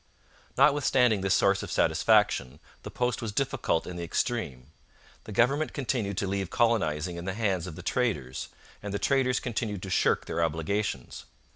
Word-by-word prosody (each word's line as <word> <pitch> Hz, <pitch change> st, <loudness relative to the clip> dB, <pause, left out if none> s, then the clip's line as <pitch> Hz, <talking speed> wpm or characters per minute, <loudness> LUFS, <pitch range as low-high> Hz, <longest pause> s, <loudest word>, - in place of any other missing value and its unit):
Notwithstanding 125 Hz, -7 st, +4 dB
this 95 Hz, -1 st, +2 dB
source 100 Hz, 0 st, +3 dB
of -, -, -6 dB
satisfaction, 65 Hz, +4 st, +2 dB, 0.2 s
the -, -, -8 dB
post 125 Hz, -1 st, -1 dB
was 115 Hz, -3 st, -3 dB
difficult 130 Hz, -8 st, 0 dB
in 90 Hz, -, -7 dB
the 85 Hz, -, -4 dB
extreme. 80 Hz, -, -3 dB, 0.5 s
The -, -, -8 dB
government 130 Hz, +8 st, +2 dB
continued 115 Hz, -8 st, -2 dB
to 100 Hz, -, -1 dB
leave 95 Hz, -1 st, -2 dB
colonizing 90 Hz, -8 st, +1 dB
in 85 Hz, -, -6 dB
the 95 Hz, +1 st, -3 dB
hands 95 Hz, -6 st, -1 dB
of 85 Hz, -, -7 dB
the 90 Hz, -, -9 dB
traders, 90 Hz, -, -1 dB, 0.3 s
and 100 Hz, -1 st, -5 dB
the -, -, +1 dB
traders 130 Hz, +1 st, +1 dB
continued 110 Hz, -5 st, -3 dB
to 95 Hz, -, -6 dB
shirk -, -, +2 dB
their 85 Hz, -, -1 dB
obligations. 80 Hz, -, -2 dB
100 Hz, 165 wpm, -28 LUFS, 85-120 Hz, 0.5 s, Notwithstanding